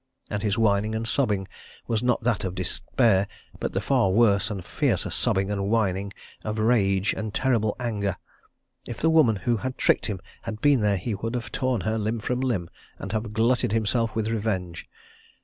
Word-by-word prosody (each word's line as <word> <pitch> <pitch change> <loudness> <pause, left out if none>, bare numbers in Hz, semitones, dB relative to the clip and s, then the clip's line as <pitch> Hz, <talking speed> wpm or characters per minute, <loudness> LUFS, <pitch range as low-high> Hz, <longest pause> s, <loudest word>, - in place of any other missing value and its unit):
And 105 -1 -1
his 105 -2 0
whining 110 0 +2
and 115 +1 -2
sobbing 105 -8 0 0.4
was 110 -2 0
not 125 -2 +1
that 115 -4 +1
of 95 -1 -3
despair, 95 +2 +1 0.3
but - - -3
the 95 - +1
far 125 -3 +2
worse 100 -1 +3
and 100 -4 -5
fiercer - - 0
sobbing 95 +1 0
and 100 -1 -1
whining 100 -3 +1 0.3
of 110 0 -3
rage 100 -4 +2
and 110 -1 -4
terrible 115 -5 +1
anger. 105 -6 -2 0.7
If 120 - -5
the 160 - +2
woman 150 -9 +5
who 115 +5 0
had 130 +5 -4
tricked - - +2
him 100 -4 -3 0.2
had 110 -2 -6
been 145 -1 +4
there 105 -1 +2
he 110 +5 -3
would 115 +4 -3
have 120 - -4
torn 130 -2 0
her 110 0 -1
limb 110 +2 -1
from 125 +3 -2
limb, 115 -10 -1 0.3
and 95 - -6
have 110 0 -2
glutted 115 0 +2
himself 115 +1 0
with 110 -1 0
revenge. 100 -6 -2
110 Hz, 185 wpm, -25 LUFS, 100-115 Hz, 0.7 s, woman